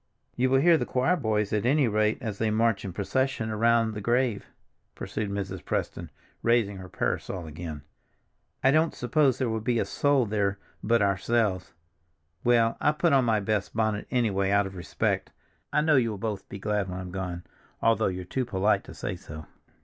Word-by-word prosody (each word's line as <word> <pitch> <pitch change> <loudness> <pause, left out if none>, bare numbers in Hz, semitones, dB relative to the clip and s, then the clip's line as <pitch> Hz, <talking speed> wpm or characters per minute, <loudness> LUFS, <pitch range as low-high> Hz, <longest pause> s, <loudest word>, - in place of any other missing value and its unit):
"You 130 +1 +2
will 135 0 +4
hear 170 0 +5
the - - -1
choir 130 +8 +2
boys 110 - -1
at 105 - +1
any 135 +2 +3
rate 105 0 +1
as 110 -5 -4
they 110 - +1
march 110 -2 +1
in 95 - -4
procession 110 +4 -1
around 115 +1 +2
the 105 - -5
grave," 120 0 0 0.5
pursued 105 -2 -4
Mrs. 100 -1 -4
Preston, - - -3 0.3
raising 115 -4 +2
her 95 -1 -9
parasol 90 -1 -3
again. 80 -1 -7 0.8
"I 135 - +5
don't 155 +2 +2
suppose 135 0 +2
there 130 - 0
will 110 -1 -1
be 120 +1 0
a - - +1
soul 145 -3 +2
there 100 -2 0 0.3
but 115 0 +3
ourselves. 100 -2 0 0.7
Well, 115 -1 +3
I 150 - +3
put 165 0 +2
on 135 -2 +4
my 110 -2 +2
best 105 +1 -2
bonnet, 110 -2 0
anyway, 100 -6 +1
out 100 0 +3
of 95 0 -7
respect—I 90 - -3
know 155 -2 +4
you 120 -3 +2
will 105 - -4
both 105 -1 -4
be - - -6
glad 105 -1 -1
when 90 0 -5
I'm 90 -1 -7
gone, 90 -2 -4 0.4
although 115 0 +2
you're 90 -1 -4
too 130 +8 -2
polite 105 -3 +1
to - - -11
say - - -4
so." 80 0 -10
110 Hz, 190 wpm, -27 LUFS, 100-120 Hz, 0.8 s, hear